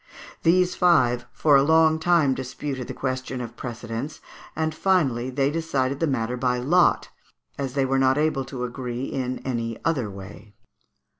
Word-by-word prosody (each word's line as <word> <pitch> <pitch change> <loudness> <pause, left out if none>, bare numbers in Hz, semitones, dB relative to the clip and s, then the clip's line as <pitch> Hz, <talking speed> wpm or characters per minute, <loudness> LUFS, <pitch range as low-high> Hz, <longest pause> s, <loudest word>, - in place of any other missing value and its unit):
These 180 +2 +3
five 130 -10 +3
for 150 -2 +3
a 135 - +6
long 160 +2 +4
time 160 -4 +3
disputed 130 0 -5
the - - -5
question 130 -1 -3
of 120 -1 -7
precedence, 120 +4 -6 0.4
and 160 0 -1
finally 145 -10 +1
they 135 +2 0
decided 140 -4 -1
the 165 - +1
matter 125 -3 -1
by 125 0 0
lot, 165 +9 +2 0.5
as 135 -2 -3
they 135 -1 +2
were 135 0 +1
not 135 +1 +3
able 150 -3 +1
to 125 -2 -6
agree 125 0 -4
in 130 -2 -3
any 115 -3 -2
other 135 -10 0
way. 100 +1 -11
135 Hz, 160 wpm, -24 LUFS, 125-155 Hz, 0.5 s, a